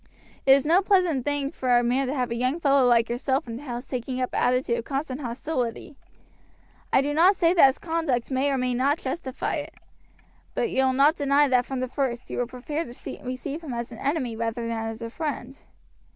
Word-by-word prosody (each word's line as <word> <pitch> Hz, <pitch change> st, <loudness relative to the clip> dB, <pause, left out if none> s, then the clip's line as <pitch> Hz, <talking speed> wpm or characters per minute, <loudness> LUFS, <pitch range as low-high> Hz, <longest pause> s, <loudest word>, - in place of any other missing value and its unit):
It 270 Hz, -, +9 dB
is 275 Hz, 0 st, +3 dB
no 340 Hz, +5 st, +4 dB
pleasant 360 Hz, -9 st, +2 dB
thing 290 Hz, -1 st, -1 dB
for 250 Hz, -2 st, +2 dB
a 240 Hz, -, +2 dB
man 255 Hz, +3 st, +1 dB
to 270 Hz, -, -2 dB
have 250 Hz, -3 st, -1 dB
a -, -, -1 dB
young 255 Hz, +7 st, 0 dB
fellow 275 Hz, -4 st, +4 dB
like 235 Hz, -1 st, +4 dB
yourself 265 Hz, +4 st, -1 dB
in 230 Hz, 0 st, -5 dB
the -, -, -9 dB
house 245 Hz, -3 st, -6 dB
taking 255 Hz, 0 st, -4 dB
up 255 Hz, -, -2 dB
an -, -, 0 dB
attitude 245 Hz, -1 st, +1 dB
of -, -, -5 dB
constant 275 Hz, +1 st, -3 dB
hostility. 250 Hz, +1 st, -4 dB, 1.0 s
I 265 Hz, -, +4 dB
do 290 Hz, +1 st, -1 dB
not 355 Hz, +6 st, +5 dB
say 345 Hz, -2 st, +3 dB
that 335 Hz, -6 st, +7 dB
his 265 Hz, -, 0 dB
conduct 320 Hz, -8 st, -1 dB
may 265 Hz, +2 st, +1 dB
or 275 Hz, -, +1 dB
may 250 Hz, -1 st, 0 dB
not 275 Hz, +5 st, +2 dB
justify 265 Hz, -2 st, -3 dB
it; -, -, -7 dB, 0.8 s
but 465 Hz, -, 0 dB
you 265 Hz, -, +2 dB
will 260 Hz, -, +2 dB
not 285 Hz, +5 st, +4 dB
deny 285 Hz, 0 st, +3 dB
that 250 Hz, -1 st, +2 dB
from 265 Hz, -2 st, -3 dB
the 255 Hz, -, -1 dB
first 255 Hz, -2 st, -3 dB
you -, -, -3 dB
were 245 Hz, -, 0 dB
prepared 260 Hz, +4 st, -5 dB
to 245 Hz, -, -8 dB
receive 275 Hz, +5 st, -4 dB
him 280 Hz, -7 st, -5 dB
as 235 Hz, +1 st, -4 dB
an 230 Hz, -, -9 dB
enemy 275 Hz, -5 st, -1 dB
rather 230 Hz, +1 st, -3 dB
than -, -, -3 dB
as 225 Hz, 0 st, -4 dB
a 230 Hz, -, -6 dB
friend. 275 Hz, -3 st, -4 dB
260 Hz, 225 wpm, -25 LUFS, 245-290 Hz, 1.0 s, It